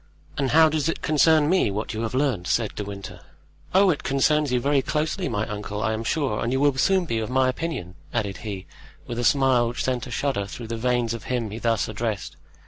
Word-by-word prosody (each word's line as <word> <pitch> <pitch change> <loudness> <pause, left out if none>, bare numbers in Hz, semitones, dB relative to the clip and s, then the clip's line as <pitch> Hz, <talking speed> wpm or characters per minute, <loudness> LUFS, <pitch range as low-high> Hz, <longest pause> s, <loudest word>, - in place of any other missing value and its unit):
"And 135 -2 0
how 160 +1 +6
does 155 0 0
it - - -3
concern 155 0 +4
me 185 - +3
what 105 +3 -3
you 110 - -3
have 115 +2 -3
learned?" 130 -10 0
said 115 -3 0
De 105 - -4
Winter. 100 -1 -8 0.5
"Oh, 190 0 +5
it 150 - -2
concerns 145 +1 +2
you 125 - +2
very 140 +2 +2
closely, 155 +6 -1
my 110 -2 -1
uncle, 105 0 -4
I 110 - +1
am 110 +1 -3
sure, 130 -3 -1
and 115 - -1
you 130 - +1
will 145 -1 +3
soon 185 +7 +2
be 115 -8 -1
of 110 - -3
my 130 0 +3
opinion," 130 - -3 0.2
added 100 -4 -2
he, 100 -4 -6 0.4
with 120 0 -4
a - - -1
smile 135 -4 +4
which 120 - -3
sent 125 -2 -1
a - - -9
shudder 120 -4 -1
through 115 +2 -8
the 115 - -2
veins 120 -1 0
of 115 - -7
him 120 -4 -2
he 110 - -6
thus 115 -3 +1
addressed. 110 -3 -3
125 Hz, 230 wpm, -24 LUFS, 110-145 Hz, 0.5 s, how